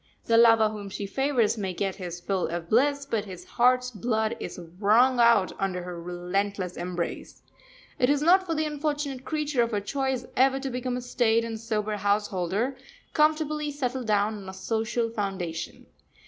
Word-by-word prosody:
The 230 Hz, -, +2 dB
lover 225 Hz, -1 st, +6 dB
whom 210 Hz, -2 st, -7 dB
she 200 Hz, +1 st, -5 dB
favours 240 Hz, 0 st, +1 dB
may 190 Hz, -3 st, -3 dB
get 195 Hz, +1 st, -2 dB
his 175 Hz, -3 st, -6 dB
fill 185 Hz, +1 st, -1 dB
of 170 Hz, 0 st, -5 dB
bliss, 280 Hz, +5 st, +2 dB
but 225 Hz, -6 st, -2 dB
his 180 Hz, -3 st, -9 dB
heart's 250 Hz, +2 st, +2 dB
blood 220 Hz, +1 st, -1 dB
is -, -, -6 dB, 0.2 s
wrung 240 Hz, +5 st, +4 dB
out 235 Hz, -5 st, +5 dB
under 185 Hz, -2 st, -2 dB
her 175 Hz, -1 st, -7 dB
relentless 180 Hz, +2 st, -2 dB
embrace. 175 Hz, -1 st, -5 dB, 0.6 s
It 250 Hz, -1 st, +3 dB
is 290 Hz, 0 st, +2 dB
not 370 Hz, +3 st, +5 dB
for 330 Hz, -, -1 dB
the 310 Hz, 0 st, 0 dB
unfortunate 295 Hz, -3 st, -3 dB
creature 300 Hz, -4 st, 0 dB
of 235 Hz, -, +1 dB
her 210 Hz, -3 st, -1 dB
choice 265 Hz, +4 st, -2 dB
ever 270 Hz, +1 st, +3 dB
to 270 Hz, -1 st, -4 dB
become 250 Hz, 0 st, -2 dB
a -, -, -4 dB
staid 230 Hz, -2 st, +1 dB
and 225 Hz, -1 st, -5 dB
sober 215 Hz, -2 st, -2 dB
householder, 205 Hz, +4 st, 0 dB, 0.4 s
comfortably 305 Hz, -1 st, +1 dB
settled 260 Hz, -4 st, -3 dB
down 210 Hz, 0 st, +1 dB
on 195 Hz, -2 st, -9 dB
a 190 Hz, -, -8 dB
social 225 Hz, +3 st, -1 dB
foundation. 190 Hz, -6 st, -4 dB
225 Hz, 175 wpm, -27 LUFS, 195-265 Hz, 0.6 s, lover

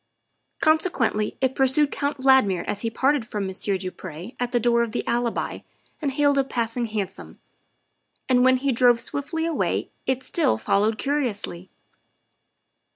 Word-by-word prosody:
Consequently 310 Hz, -, +1 dB
it 260 Hz, -1 st, +1 dB
pursued 270 Hz, +2 st, +3 dB
Count 285 Hz, 0 st, -2 dB
Valdmir 260 Hz, -9 st, +3 dB
as 205 Hz, -, -3 dB
he 230 Hz, -, -1 dB
parted 265 Hz, +3 st, +1 dB
from 210 Hz, -3 st, -4 dB
Monsieur 190 Hz, +1 st, -1 dB
du 185 Hz, 0 st, -5 dB
Pre 185 Hz, -, -9 dB
at 245 Hz, -1 st, -2 dB
the 240 Hz, -, +2 dB
door 235 Hz, 0 st, +3 dB
of 230 Hz, -2 st, -2 dB
the -, -, -3 dB
Alibi 235 Hz, -1 st, -1 dB, 0.4 s
and 280 Hz, -3 st, -1 dB
hailed 285 Hz, -1 st, +3 dB
a -, -, +3 dB
passing 235 Hz, -2 st, -2 dB
hansom; 205 Hz, -3 st, -5 dB, 0.9 s
and 250 Hz, -1 st, +4 dB
when 260 Hz, 0 st, +5 dB
he 275 Hz, +1 st, 0 dB
drove 245 Hz, -1 st, +4 dB
swiftly 285 Hz, +7 st, -3 dB
away 330 Hz, -2 st, -1 dB, 0.2 s
it 260 Hz, 0 st, 0 dB
still 320 Hz, -, +1 dB
followed 210 Hz, -, +1 dB
curiously. 225 Hz, -11 st, -2 dB
245 Hz, 155 wpm, -24 LUFS, 215-275 Hz, 0.9 s, when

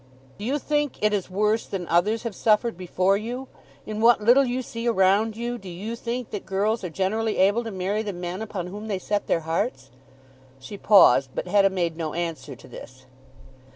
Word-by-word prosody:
"Do 205 Hz, -, -5 dB
you 275 Hz, +5 st, 0 dB
think 295 Hz, -1 st, -1 dB
it 215 Hz, 0 st, +3 dB
is 195 Hz, -3 st, -2 dB
worse 210 Hz, +4 st, 0 dB
than 180 Hz, -3 st, -5 dB
others 210 Hz, +7 st, +1 dB
have 230 Hz, -3 st, -4 dB
suffered 225 Hz, +3 st, +2 dB
before 185 Hz, +2 st, +1 dB
you? 245 Hz, +5 st, -5 dB, 0.4 s
In 215 Hz, 0 st, -4 dB
what 235 Hz, +1 st, +6 dB
little 240 Hz, +6 st, +5 dB
you 255 Hz, 0 st, -2 dB
see 230 Hz, 0 st, -5 dB
around 210 Hz, +1 st, +2 dB
you 240 Hz, +1 st, -3 dB
do 195 Hz, -, -10 dB
you 200 Hz, +7 st, -5 dB
think 235 Hz, 0 st, -5 dB
that 205 Hz, -, -5 dB
girls 205 Hz, +3 st, -1 dB
are 180 Hz, -, -3 dB
generally 215 Hz, +6 st, -1 dB
able 200 Hz, +5 st, +3 dB
to 230 Hz, -, -5 dB
marry 195 Hz, +1 st, -2 dB
the 210 Hz, -2 st, -4 dB
men 180 Hz, +1 st, -5 dB
upon 205 Hz, -5 st, -4 dB
whom 205 Hz, +4 st, -7 dB
they 200 Hz, -3 st, -1 dB
set 205 Hz, +2 st, -2 dB
their 165 Hz, -, +1 dB
hearts?" 160 Hz, -, -3 dB, 0.7 s
She 170 Hz, +10 st, -9 dB
paused, 165 Hz, -, +5 dB
but -, -, -3 dB
Hetta 195 Hz, +1 st, +4 dB
made 170 Hz, -4 st, -2 dB
no 160 Hz, -2 st, -4 dB
answer 160 Hz, -6 st, -4 dB
to -, -, -16 dB
this. 130 Hz, 0 st, -12 dB
205 Hz, 200 wpm, -24 LUFS, 180-225 Hz, 0.7 s, what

